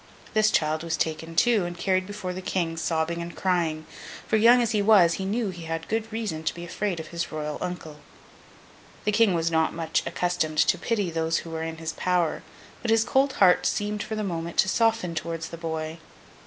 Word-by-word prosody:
This 215 -1 +4
child 155 -4 +1
was 165 0 -2
taken, 160 +1 -2
too, 220 +3 +4
and 175 0 -5
carried 185 +1 0
before 205 -3 -5
the 185 - -6
King, 175 -3 -1
sobbing 165 +1 -1
and 170 0 -7
crying; 165 -4 0 0.4
for, - - +2
young 230 +3 +6
as 235 -2 +1
he 210 -3 +2
was, 200 -5 +6
he 190 - -3
knew 210 +1 -1
he 175 -2 -9
had 165 0 -4
good 225 +1 -2
reason 215 -8 -3
to 155 - -2
be 170 0 -7
afraid 185 0 -2
of 160 - -7
his 170 0 -4
Royal 150 -1 -4
uncle. 180 -4 -5 1.1
The 210 - +1
King 210 -3 +4
was 165 0 0
not 160 -1 +1
much 165 -1 0
accustomed 160 -3 -1
to 180 - +4
pity 205 -3 -1
those 165 0 0
who 165 - -8
were 160 0 -3
in 160 0 -4
his 160 0 -4
power, 180 -3 0 0.4
but 240 - -3
his 225 0 +4
cold 265 +3 +2
heart 180 -2 +5
seemed 210 0 -1
for 220 - -4
the 215 - -2
moment 170 -3 -4
to - - +5
soften 225 -4 +1
towards 165 0 -4
the - - -7
boy. 160 0 -4
175 Hz, 210 wpm, -26 LUFS, 165-210 Hz, 1.1 s, young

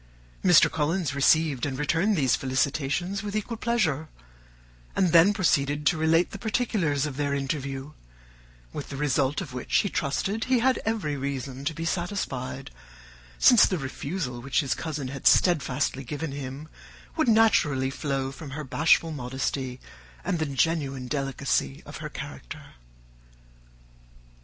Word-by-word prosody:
Mr. 175 -3 +7
Collins 160 -1 -1
received 140 -1 +3
and 135 -2 -1
returned 165 +8 +1
these 135 - +3
felicitations 140 +8 -1
with 205 0 -5
equal 215 +2 -2
pleasure, 185 - 0 0.9
and 185 -3 +2
then 170 +4 +7
proceeded 150 -7 +1
to 175 - +4
relate 160 +2 +2
the 200 - -7
particulars 200 - 0
of 140 -3 -5
their 145 -1 0
interview, 135 0 -3 0.8
with - - -6
the 140 - -6
result 145 +1 +1
of 150 -9 -8
which 125 - -3
he 200 - -2
trusted 195 +10 -1
he 255 0 +3
had 255 +2 +2
every 210 -10 -1
reason 135 -1 -4
to 155 +2 -2
be 165 - -4
satisfied, 165 -8 -3 0.7
since 240 -4 +7
the 185 - -1
refusal 135 -2 -4
which 140 +4 +1
his 135 -5 0
cousin 145 -2 -4
had 135 0 -2
steadfastly 140 -5 +2
given 145 +4 -4
him 140 +2 -6 0.5
would 315 -5 +1
naturally 150 -12 +3
flow 135 -1 -2
from 145 +1 -9
her 155 - -4
bashful 160 +4 +3
modesty 130 -1 -3 0.4
and 170 - -1
the 160 - 0
genuine 140 -2 -1
delicacy 135 - -1
of - - -8
her - - -6
character. - - -9
145 Hz, 140 wpm, -26 LUFS, 135-175 Hz, 0.9 s, Mr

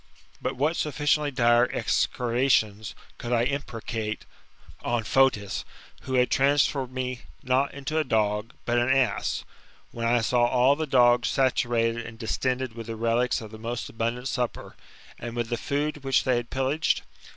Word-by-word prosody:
But - - -2
what 150 +6 +1
sufficiently 150 0 +1
dire 120 -2 +3
execrations 115 -4 +1 0.2
could 120 - -5
I 120 -1 +3
imprecate 115 -5 -3 0.6
on 120 -1 0
Fotis, 105 -5 +2 0.4
who 130 - -3
had 125 0 +3
transformed 140 -1 +2
me 130 -1 -4 0.2
not 130 +2 +1
into 145 +3 -2
a - - +2
dog, 105 -3 0
but 120 0 +2
an 120 +1 +1
ass, 135 -2 +1 0.5
when 115 0 -2
I 120 0 +3
saw 120 +1 +3
all 130 +3 +4
the 155 +1 -3
dogs 120 -2 +4
saturated 120 -3 +1
and 115 0 -9
distended 125 +2 -2
with 115 -1 -8
the 115 - -4
relics 115 +3 +1
of 110 -1 -9
the 110 - -10
most 115 +2 -4
abundant 115 +3 -2
supper, 125 -3 -3 0.4
and 120 0 -6
with 120 -1 -2
the 120 - 0
food 145 +3 -2
which 135 -1 +2
they 130 -2 +2
had 120 0 -4
pillaged? 135 +4 0
125 Hz, 160 wpm, -26 LUFS, 115-135 Hz, 0.6 s, all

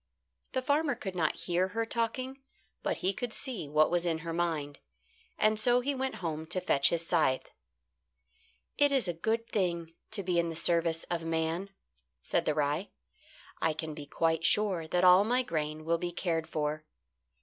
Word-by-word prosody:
The 260 -1 -1
farmer 285 0 +2
could 190 -4 -6
not 160 -3 +1
hear 180 +1 +1
her 225 +4 -2
talking, 255 +4 -2 0.4
but - - -1
he 190 - +3
could 245 +3 -4
see 230 - -2
what 155 +2 +3
was 175 -1 +2
in 170 -2 0
her 165 - -3
mind, 160 -4 -2 0.6
and 215 0 +3
so 245 +2 +4
he 280 +3 -1
went 265 0 -2
home 160 0 -3
to 180 +2 0
fetch 140 -6 +3
his 170 -1 -1
scythe. 155 -7 +1 1.3
"It 285 0 +5
is 265 -7 +3
a 175 - -1
good 225 +7 -1
thing 170 -4 -1 0.2
to 215 -2 -2
be 175 -1 +1
in 170 0 +1
the 165 - -5
service 165 0 +1
of 170 -1 -1
man," 165 +3 -1 0.5
said - - 0
the 155 - +1
rye. 150 +5 0 0.7
"I 160 - +2
can 160 0 -5
be 150 -1 -8
quite 165 +1 0
sure 190 -4 +3
that 180 +3 +1
all 180 +2 +8
my 250 +4 +2
grain 155 -5 -3
will 165 +1 +1
be 175 0 -3
cared 165 -2 -2
for. 155 -1 -2
175 Hz, 180 wpm, -30 LUFS, 160-215 Hz, 1.3 s, all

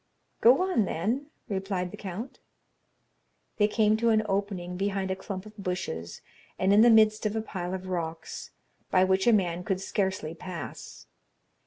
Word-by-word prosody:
"Go 255 +9 +6
on, 365 - +2
then," 225 - -1 0.2
replied 190 -3 -2
the - - -7
count. 210 +6 -7 1.2
They 210 -2 +4
came 215 0 +3
to 230 +1 +2
an 220 -1 +4
opening 195 -3 -2
behind 195 0 -1
a - - 0
clump 190 0 -6
of 215 0 -12
bushes 180 - -4 0.4
and 190 +2 +3
in 210 - +7
the 240 - +7
midst 215 -1 +5
of 210 - -3
a 220 - 0
pile 180 -3 -4
of 185 0 -7
rocks, 165 -3 -4 0.4
by 185 - +4
which 190 +3 +2
a - - +8
man 180 -5 +1
could 190 +1 -1
scarcely 190 -5 -2
pass. 170 0 -8
195 Hz, 165 wpm, -28 LUFS, 180-215 Hz, 1.2 s, a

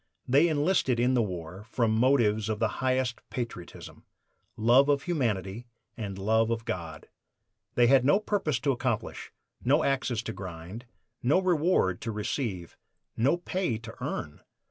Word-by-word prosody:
They 140 +7 +5
"enlisted 150 -5 +1
in 125 +2 +3
the 125 - +3
war" 90 -2 -5
from 115 -3 +1
motives 110 -3 +3
of 110 - -1
the 110 - +2
highest 130 -2 0
patriotism 115 -8 -7 0.5
love 120 +6 +5
of 140 -1 +2
humanity 115 - -2 0.3
and 100 -5 -5
love 110 +3 +2
of 115 -1 -2
God. 85 -3 -5 0.7
They 120 - +5
had 130 +1 +5
no 145 +10 +4
purpose 195 - -1
to 140 - +2
accomplish, 125 -3 -3 0.3
no 145 +5 +3
axes 130 -4 0
to 115 - -4
grind, 95 +5 -8 0.4
no 145 +9 +3
reward 170 - +2
to 115 - -3
receive, 105 - -3 0.4
no 135 +9 +2
pay 180 - -2
to 115 0 -10
earn! 75 - -4
120 Hz, 145 wpm, -28 LUFS, 105-140 Hz, 0.7 s, They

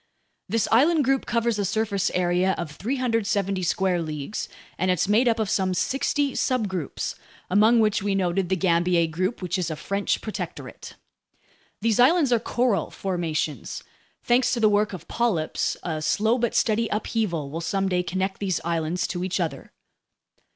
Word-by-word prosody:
This 225 +2 +1
island 300 +7 +4
group 270 0 +1
covers 235 -2 0
a - - +1
surface 200 0 0
area 180 +1 +2
of 155 - -4
370 210 - -1
square 180 +1 +1
leagues, 155 +4 -4 0.3
and 185 - +1
it's 180 0 +2
made 220 +5 +3
up 230 -1 +3
of 220 -2 0
some 190 -2 0
sixty 275 - 0
subgroups, 205 - -2 0.4
among 215 +5 +5
which 215 -3 +2
we 200 0 0
noted 185 -1 0
the 190 - +2
Gambier 175 -1 +2
group, 185 +6 -2
which 180 +1 -1
is 175 - -1
a 155 - -3
French 200 +5 -1
protectorate. 215 - -7 0.9
These 225 -1 +1
islands 275 0 +5
are 235 - +3
coral 235 -8 0
formations. 165 -5 -3 0.4
Thanks 245 +1 +3
to - - -2
the 215 -2 +5
work 210 +1 +2
of 185 -5 -8
polyps, 205 -10 0
a 160 -3 -3
slow 220 +9 +1
but 235 0 0
steady 230 -1 +2
upheaval 205 -9 -2
will 165 +2 -4
someday 190 +1 0
connect 190 +2 -2
these 190 -4 -1
islands 170 +1 -1
to 175 0 -3
each 185 +1 -1
other. 160 -6 -4
195 Hz, 160 wpm, -25 LUFS, 175-230 Hz, 0.9 s, among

